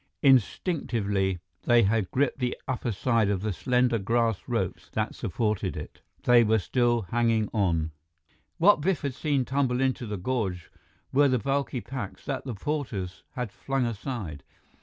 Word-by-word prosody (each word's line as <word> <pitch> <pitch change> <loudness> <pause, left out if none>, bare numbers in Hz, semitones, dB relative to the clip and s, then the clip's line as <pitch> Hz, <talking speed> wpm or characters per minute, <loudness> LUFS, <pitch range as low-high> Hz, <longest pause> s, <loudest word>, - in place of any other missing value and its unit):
Instinctively, 110 - +2 0.3
they 120 -1 +5
had 105 -1 +1
gripped 140 +1 0
the 125 -1 -1
upper 125 -2 -1
side 115 0 +1
and 100 -2 +1
the 105 -1 -1
slender 125 +2 +2
grass 115 +1 +1
ropes - - -2
that - - -1
supported 105 +3 -1
it. - - -8 0.2
They 120 -1 +6
were 110 0 +3
still 120 +3 +1
hanging 115 -2 +2
on. 85 -7 +1 0.7
What 180 -1 +5
Biff 185 +1 +1
had 140 -2 -1
seen 140 -1 0
tumble 130 -2 +1
into 130 -2 0
the 105 -1 -3
gorge 95 -4 -2 0.4
were 145 +2 +5
the 130 -1 +2
bulky 135 0 -1
packs 125 -6 -6
that 135 -2 -3
the 125 -4 -4
porters 105 -7 -3
had 125 -5 -4
flung 135 +2 -1
aside. 105 - -4
120 Hz, 155 wpm, -27 LUFS, 105-130 Hz, 0.7 s, They